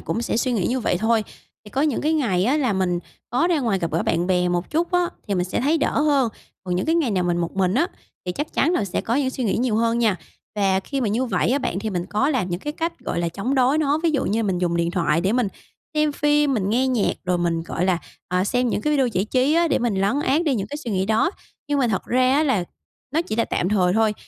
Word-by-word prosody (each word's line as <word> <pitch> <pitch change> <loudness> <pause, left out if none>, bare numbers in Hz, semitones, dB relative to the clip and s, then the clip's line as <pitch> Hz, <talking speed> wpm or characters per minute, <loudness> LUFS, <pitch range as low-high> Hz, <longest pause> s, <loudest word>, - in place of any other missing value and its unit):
cũng 230 - -3
sẽ 230 - -1
suy 250 +2 0
nghĩ 205 -6 0
như 255 +1 0
vậy 180 - +1
thôi. 220 +1 +2 0.4
Thì 210 - -12
có 265 - -1
những 295 -5 +1
cái 310 +2 +1
ngày 210 - +1
á, 265 +7 +2
là 260 -7 +1
mình 185 -2 0 0.3
có 255 +8 +2
ra 325 -4 +2
ngoài 225 -7 0
gặp 170 -2 -2
gỡ 165 - +1
bạn 170 +1 0
bè 180 -1 +2
một 175 0 -2
chút 330 +3 0
á, 355 -1 +2 0.2
thì 200 - 0
mình 180 -1 +1
sẽ 185 - -2
thấy 300 +6 +2
đỡ 290 - +1
hơn. 285 -5 +3 0.4
Còn 180 -1 -2
những 180 - -1
cái 325 - +2
ngày 320 -8 +1
nào 185 -3 0
mình 175 -1 +1
một 170 +2 -3
mình 185 0 +2
á, 305 +7 +3 0.4
thì 180 - -1
chắc 295 - -4
chắn 325 - +2
là 225 - +1
sẽ 195 -1 -2
có 230 - -2
những 265 -1 +1
suy 255 - -3
nghĩ 200 - +1
nhiều 240 -3 +1
hơn 230 +1 +1
nha. 220 -5 +2 0.4
Và 195 -2 +2
khi 275 +7 -4
mà 235 - 0
như 230 +6 0
vậy 205 -2 0
á, 270 - +2
bạn, 190 - -2
thì 215 +2 -3
mình 180 -2 -3
có 215 +7 +1
làm 245 -10 0
những 175 +1 -3
cái 295 - -4
cách, 330 +2 -3
gọi - - -3
là, 170 - 0
chống 200 +10 -2
đối 265 +3 +3
nó. 295 -1 +2
Ví 335 - +3
dụ 290 -4 0
như 215 - 0
là - - +1
mình 185 -3 0
dùng 175 -1 0
điện 170 0 0
thoại 170 -3 +1
để 190 +4 +1
mình 245 -3 +1 0.5
xem 305 -1 +2
phim, 295 -1 +2
mình 200 -4 0
nghe 250 +4 +2
nhạc, 245 -5 +1
rồi 180 -1 +1
mình, 170 -1 0
gọi 170 +1 -2
là, 185 -2 +2 0.3
à, 180 +1 +1
xem 245 +4 +1
những 210 - -1
cái 300 - 0
video 270 -3 +3
giải 195 -4 0
trí 255 +6 +1
á, 335 0 +3
để - - +2
mình 240 -3 0
lấn 205 +9 +1
át 295 +3 +2
đi 295 -5 +2
những 200 -5 -2
cái 290 - -6
suy 270 -6 -6
nghĩ 190 -1 0
đó. 220 +10 +2 0.4
Nhưng 290 - +1
mà 255 -3 +2
thật 195 -4 -1
ra 255 +1 +3
á 295 - +3
là 260 - +1 0.5
nó 325 - +3
chỉ 215 - -4
là 230 - +2
tạm 180 - -1
thời 185 -4 +2
thôi, 220 +1 +2
230 Hz, 295 wpm, -22 LUFS, 185-275 Hz, 0.5 s, hơn